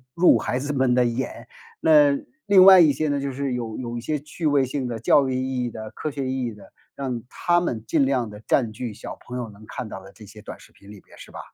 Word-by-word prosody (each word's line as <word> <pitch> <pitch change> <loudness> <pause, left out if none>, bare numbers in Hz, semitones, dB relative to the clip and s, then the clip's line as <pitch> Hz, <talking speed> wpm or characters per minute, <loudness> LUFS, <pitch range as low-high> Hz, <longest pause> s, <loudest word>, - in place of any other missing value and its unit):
入 175 +1 +5
孩 125 - -2
子 145 +3 -3
们 130 -3 +1
的 125 - +4
眼。 120 +2 -3 0.3
那 145 -3 +5 0.3
另 195 -2 +7
外 190 -1 +9
一 155 -4 +6
些 155 +3 -1
呢， 145 0 0
就 140 -1 -4
是 140 0 -3
有 115 -3 -4
有 120 -2 -5
一 - - -5
些 150 +5 -2
趣 150 +3 -8
味 145 -2 +3
性 130 0 -3
的， 120 - -4
教 135 +4 +3
育 130 - -2
意 130 0 -2
义 - - -3
的， 110 -1 -8
科 155 - -5
学 140 -2 -4
意 130 -1 -2
义 115 - -4
的， 100 -2 -16 0.2
让 130 -4 -4
它 175 0 +1
们 120 -10 -3
尽 135 +4 +2
量 125 -5 0
地 105 0 -11
占 120 -5 +2
据 110 0 -6
小 - - -9
朋 125 0 -8
友 120 -3 -5
能 105 +1 -15
看 120 -4 -6
到 95 - -8
的 95 +1 -15
这 105 +2 -14
些 105 +1 -14
短 - - -9
视 - - -19
频 100 - -19
里 105 -2 -12
边， - - -20
是 - - -13
吧？ - - -9
130 Hz, 290 characters per minute, -23 LUFS, 115-140 Hz, 0.3 s, 外